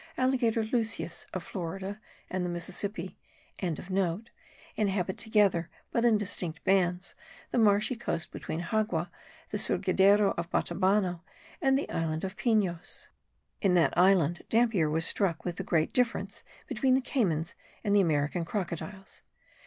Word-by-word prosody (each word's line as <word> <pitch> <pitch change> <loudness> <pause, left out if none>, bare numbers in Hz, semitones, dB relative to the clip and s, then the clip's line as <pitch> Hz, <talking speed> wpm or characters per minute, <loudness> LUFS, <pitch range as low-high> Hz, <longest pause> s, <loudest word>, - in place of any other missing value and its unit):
Alligator 250 -4 +2
lucius 225 -5 -2
of 185 - -4
Florida 190 +4 -5 0.3
and 185 -1 -2
the 180 - -2
Mississippi.) 185 +1 -3 0.4
inhabit 190 +2 -3
together, 205 -7 +2 0.2
but 235 - +1
in 235 -3 +5
distinct 185 -5 -3
bands, 185 -1 +1 0.4
the - - +1
marshy 210 +3 +3
coast 170 -8 -4
between 160 - -4
Xagua, 175 -3 -1 0.4
the - - -1
Surgidero 200 +1 +3
of 170 0 -4
Batabano, 185 0 +1 0.4
and 270 -3 +4
the 285 - -2
island 160 -1 -2
of 190 +1 -4
Pinos. 195 -7 -1 0.5
In 190 -4 +3
that 170 -2 +3
island 175 -2 +4
Dampier 225 -9 +3
was 160 +2 +3
struck 175 -5 +1
with 175 -2 -3
the - - -3
great 160 -2 +1
difference 230 -5 0 0.2
between 255 +3 +2
the 265 - +2
caymans 175 - 0 0.3
and 205 -2 +2
the 205 - +6
American 155 0 +1
crocodiles. 190 +2 -5
190 Hz, 135 wpm, -29 LUFS, 170-215 Hz, 0.5 s, the